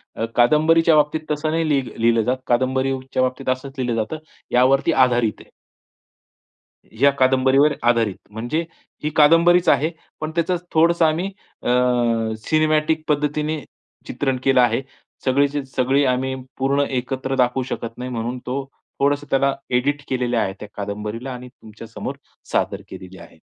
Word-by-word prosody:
अ, 115 - -2
कादंबरीच्या 155 +6 +4
बाबतीत 150 +1 +2
तसं 150 +1 -1
नाही 165 0 0
लिह 140 -3 +2
लिहिलं 115 0 +3
जात. 125 +4 0
कादंबरीच्या 130 +1 0
बाबतीत 130 +1 -2
असंच 130 +1 -2
लिहिलं 125 -3 -1
जातं 155 +9 -6 0.3
यावरती 135 +5 +3
आधारित 120 -6 +2
आहे. - - -19 1.5
या 140 0 +6
कादंबरीवर 130 +3 +4
आधारित. 115 -4 +2 0.2
म्हणजे 120 +9 -2 0.4
ही 150 - 0
कादंबरीच 170 +3 +5
आहे 155 +3 +3 0.3
पण 155 0 -4
त्याचं 170 +2 +1 0.2
थोडंसं 165 +1 +4
आम्ही 160 +3 +1 0.4
अ, - - -2 0.8
सिनेमॅटिक 155 0 +2
पद्धतीने 150 +1 0 0.5
चित्रण 135 -2 -1
केलं 135 -2 +4
आहे. 120 +1 +2 0.4
सगळीच्या 140 +2 +1
सगळी 135 +2 +2
आम्ही 130 +1 0 0.2
पूर्ण 140 +2 +1 0.2
एकत्र 130 +1 -3
दाखवू 125 0 +1
शकत 115 -2 -6
नाही 125 +1 -5
म्हणून 120 +1 -3
तो, 135 +3 -2 0.4
थोडंसं 145 +1 +1
त्याला 135 0 +2 0.2
एडिट 140 +4 0
केलेलं 125 -2 0
आहे 100 -4 0
त्या 105 - -8
कादंबरीला 105 +5 -5
आणि 125 0 -9
तुमच्यासमोर 110 -2 -9 0.4
सादर - - 0
केलेली 95 0 -10
आहे. 85 -2 -15
135 Hz, 140 wpm, -21 LUFS, 125-150 Hz, 1.5 s, या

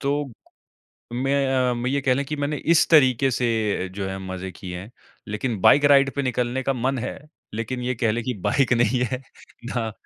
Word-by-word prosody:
तो 140 -2 -1 0.8
मैं 130 0 +1
अ, - - 0
मैं 120 +1 -2
ये 140 +1 +1
कह 130 -2 +2
लें 140 +2 -1
कि 150 - -3
मैंने 145 +1 -2 0.2
इस - - +4
तरीक़े 135 -4 +5
से 110 -6 0
जो 100 -1 -3
है 95 0 -5
मज़े 95 0 -5
किए 90 -3 -7
हैं 100 +5 -10 0.4
लेकिन 105 0 -3
बाइक 145 +1 +6
राइड 135 -1 +5
पे 140 - -1
निकलने 125 0 -1
का 135 - 0
मन 130 +1 -1
है 120 - -4 0.4
लेकिन 115 +3 -3
ये 125 +1 -1
कह 115 -2 0
लें 120 +2 -2
कि 125 - -2
बाइक 135 -3 +2
नहीं 120 +1 +2
है 130 - -2 0.5
ना, 125 -1 -2
ना 110 -1 -3
125 Hz, 210 wpm, -23 LUFS, 115-135 Hz, 0.8 s, बाइक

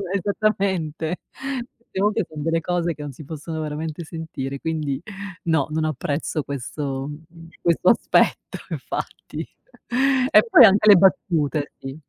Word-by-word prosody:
esattamente 190 -5 0 0.6
certe 225 -4 -8
volte 210 0 +2
fan 155 -1 -8
delle 165 +2 0
cose 175 -1 -1
che - - -10
non 145 - -5
si 150 - -11
possono 160 +2 -6
veramente 155 +2 -4
sentire 150 -4 -6
quindi 155 -4 -2 0.4
no, 160 -4 +1
non 155 +1 -1
apprezzo 150 +1 -2
questo 140 0 -4 0.5
questo 170 +2 +3
aspetto 235 - +2
infatti - - -5 0.9
e 215 +2 +6
poi - - +9
anche 210 +1 +5
le 205 - +11
battute 160 -5 +2
sì 135 0 -7
160 Hz, 130 wpm, -23 LUFS, 145-180 Hz, 0.9 s, le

